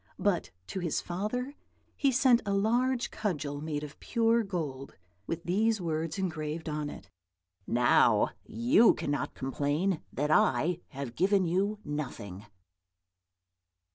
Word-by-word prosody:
But 200 -4 0 0.2
to 190 - -5
his 170 -4 -1
father 215 +9 -3 0.4
he 275 -2 +2
sent 250 -1 +4
a 200 -2 -1
large 240 +5 +1
cudgel 145 -8 -3
made 150 -1 -3
of 150 0 -9
pure 230 0 +2
gold, 155 -10 -4 0.3
with 165 0 -3
these 215 +5 +1
words 165 -1 -2
engraved 160 -4 -3
on 150 -1 -2
it: - - -10 0.6
'Now 120 +1 +4
you 120 - +4
cannot 145 -2 -2
complain 145 +7 -1
that 150 +2 -1
I 170 +2 +3
have 135 -4 -6
given 195 0 +3
you 195 +5 0
nothing!'" 120 - -5
170 Hz, 125 wpm, -30 LUFS, 145-205 Hz, 0.6 s, sent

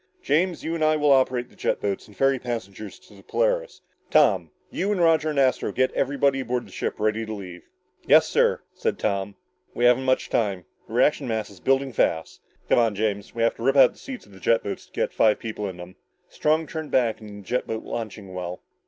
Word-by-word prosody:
"James, 170 +5 +1
you 165 - -2
and 165 -2 -1
I 155 0 +4
will 150 -1 +3
operate 130 -2 +2
the - - -21
jet - - -1
boats 100 -1 -3
and 105 - -18
ferry 135 -1 +2
the - - -26
passengers 110 -5 -5
to - - -20
the 100 - -15
Polaris. - - -1 0.3
Tom, - - +4 0.2
you 200 +3 -1
and 205 - 0
Roger 165 -2 +3
and 150 - -3
Astro 130 -2 +2
get 130 0 +1
everybody 140 0 +1
aboard 125 -1 -2
the - - -16
ship - - -3
ready 110 +1 0
to 110 - -6
leave." 90 -4 -8 0.4
"Yes, - - +6
sir," - - +2
said - - -2
Tom. 100 -1 -2 0.4
"We 120 - +1
haven't 125 +2 +4
much 130 0 +1
time. 100 -6 0 0.2
The - - -11
reaction - - +2
mass 110 -3 -2
is 95 - -15
building 135 +2 +1
fast. 80 -6 0 0.3
Come - - +4
on, 115 -3 +2
James, 105 0 -2
we 115 - 0
have 115 - +3
to 115 - -7
rip 135 +2 +3
out 135 -2 +7
the - - -20
seats 265 -3 -8
in - - -20
the 95 - -14
jet 115 +5 +2
boats 100 - -6
to - - -31
get - - -2
five 110 -1 +4
people 105 -3 -5
in 90 - -9
them." 90 +1 -10 0.3
Strong 155 +1 +1
turned 155 -1 -6
back 115 -4 +1
into 105 -1 -10
the 100 - -10
jet 125 - -1
boat 110 0 -4
launching 110 -4 -6
well. 90 0 -5
120 Hz, 230 wpm, -24 LUFS, 105-135 Hz, 0.4 s, out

